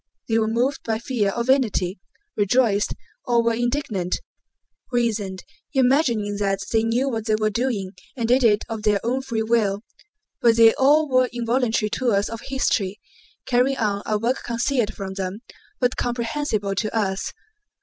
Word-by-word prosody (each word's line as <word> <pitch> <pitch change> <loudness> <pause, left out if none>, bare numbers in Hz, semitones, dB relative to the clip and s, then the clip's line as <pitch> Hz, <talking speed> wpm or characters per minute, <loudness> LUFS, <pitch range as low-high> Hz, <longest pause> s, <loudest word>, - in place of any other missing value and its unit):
They 225 0 +2
were 220 - +1
moved 245 +5 0
by 220 -1 -1
fear 225 -4 -1
or 235 - +1
vanity, 225 -8 +1 0.4
rejoiced 210 0 +2 0.3
or 235 -2 +2
were 230 0 +2
indignant, 235 -6 -1 0.7
reasoned, 215 -6 -1 0.3
imagining 245 -6 +2
that 195 -1 0 0.2
they 225 - +4
knew 235 +4 +1
what 225 -5 -2
they 215 - +3
were 215 0 0
doing 210 -4 -1 0.3
and 235 -2 -1
did 250 +2 +3
it 210 -2 +4
of 225 -2 -5
their 210 -1 +2
own 255 +3 0
free 235 -4 -2
will, 220 -3 +1 0.6
but 230 -1 +5
they 225 -1 +7
all 300 +3 +4
were 255 -2 +3
involuntary 235 -2 0
tools 215 -6 +1
of 230 +1 -6
history, 210 -7 -1 0.5
carrying 255 +2 +2
on 205 -3 0
a 215 - +1
work 235 +5 -1
concealed 235 -1 -1
from 195 -1 -5
them 190 +2 -4 0.4
but 250 0 +1
comprehensible 235 -4 -1
to 215 +3 -2
us. 195 -3 -1
230 Hz, 160 wpm, -23 LUFS, 210-250 Hz, 0.7 s, they